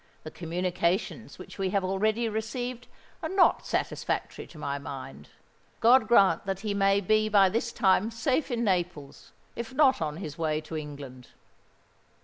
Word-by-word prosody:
The 155 - -8
communications 180 +5 -2
which - - -12
we 190 -1 0
have 195 0 0
already 215 +5 0
received 245 +3 -4 0.3
are - - -3
not 380 -1 +3
satisfactory - - -3
to - - -15
my 140 -1 -3
mind. 130 - -9 0.5
God 245 +3 +5
grant 195 -7 +4
that 195 0 -2
he 210 -2 -2
may 195 0 +3
be 215 +2 +2
by 200 -2 +5
this 230 +4 -1
time 195 +1 +2
safe 255 +6 -1
in 235 -2 -1
Naples—if 180 - -4
not 270 - +4
on 150 -1 -2
his 165 -3 -7
way 155 -2 0
to 155 +1 -8
England." 140 -5 -8
195 Hz, 150 wpm, -28 LUFS, 160-225 Hz, 0.5 s, God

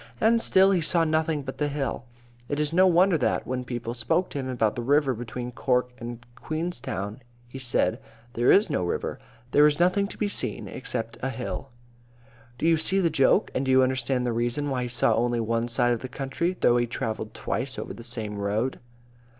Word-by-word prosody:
And 230 +1 +4
still 190 -2 +5
he 185 -3 +2
saw 165 +1 +2
nothing 155 -2 0
but 130 0 -7
the 150 - +1
hill. 140 -3 -3 0.4
It 145 - -1
is 150 +1 0
no 185 +2 +6
wonder 180 -1 +4
that, 125 - 0
when 125 0 -3
people 120 -2 -4
spoke 125 +10 0
to 145 - -4
him 130 - -4
about 115 -4 +1
the 120 - -3
river 140 +2 +2
between 120 +1 -6
Cork 125 0 0
and 120 0 -7
Queenstown, 130 - -4 0.3
he 130 +2 -9
said, 125 -2 0 0.3
"There 120 +2 +3
is 205 - +5
no 145 - -1
river. 85 - -3 0.3
There 145 +1 +6
is 150 0 0
nothing 185 +3 +3
to - - -10
be 210 - 0
seen 205 - -3
except 115 0 -4
a 135 - -1
hill." 125 -2 -5 0.9
Do 160 - 0
you 165 -1 +5
see 190 +5 +2
the 170 -4 +2
joke? 135 -2 +3
And 130 - -1
do 130 - -2
you 130 0 +6
understand 130 -1 0
the 120 - 0
reason 120 +5 -1
why 130 -1 -1
he 125 - -3
saw 120 - +2
only 120 0 +1
one 115 +1 0
side 120 0 +3
of 120 - -2
the 130 - -7
country, 140 +8 -2
though 120 - +4
he 120 0 +1
travelled 110 -2 -4
twice 130 +4 -3
over - - -5
the - - -10
same 110 -4 -4
road? 105 +6 -1
130 Hz, 210 wpm, -26 LUFS, 120-155 Hz, 0.9 s, no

